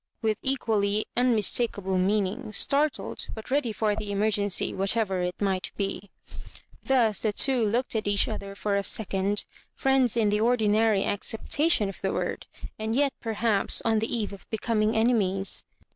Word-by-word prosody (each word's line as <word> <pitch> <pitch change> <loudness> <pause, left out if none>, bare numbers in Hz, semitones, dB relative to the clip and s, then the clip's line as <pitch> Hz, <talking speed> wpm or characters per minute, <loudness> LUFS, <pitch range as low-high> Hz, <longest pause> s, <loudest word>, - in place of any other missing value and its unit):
with 220 -1 0
equally 215 -6 0
unmistakable 225 -4 +1
meaning, 210 +4 -1
startled, 285 +7 0
but 220 +3 -10
ready 270 -4 +1
for 210 0 0
the 210 -1 -5
emergency, 205 -1 +1
whatever 195 -1 0
it 180 0 -3
might 190 -2 -1
be. 195 0 -4 0.7
Thus 235 -6 +1
the 215 - +1
two 255 +3 +3
looked 235 +4 0
at 215 -2 -1
each 205 0 +3
other 200 0 -6
for 205 0 -1
a 200 - 0
second, 200 0 0 0.3
friends 265 -4 +2
m 215 -3 +2
the 210 +1 +1
ordinary 220 -3 +2
acoeptatlon 225 - 0
of 195 - -8
the - - -1
word, - - -3 0.3
and, 220 +1 -2
yet, 280 0 +2
perhaps, 220 -2 +1
on 225 -1 +2
the 220 - -3
eve 215 -4 -1
of 200 - -13
becoming 220 0 0
enemies. 205 -4 +1
215 Hz, 155 wpm, -26 LUFS, 200-230 Hz, 0.7 s, two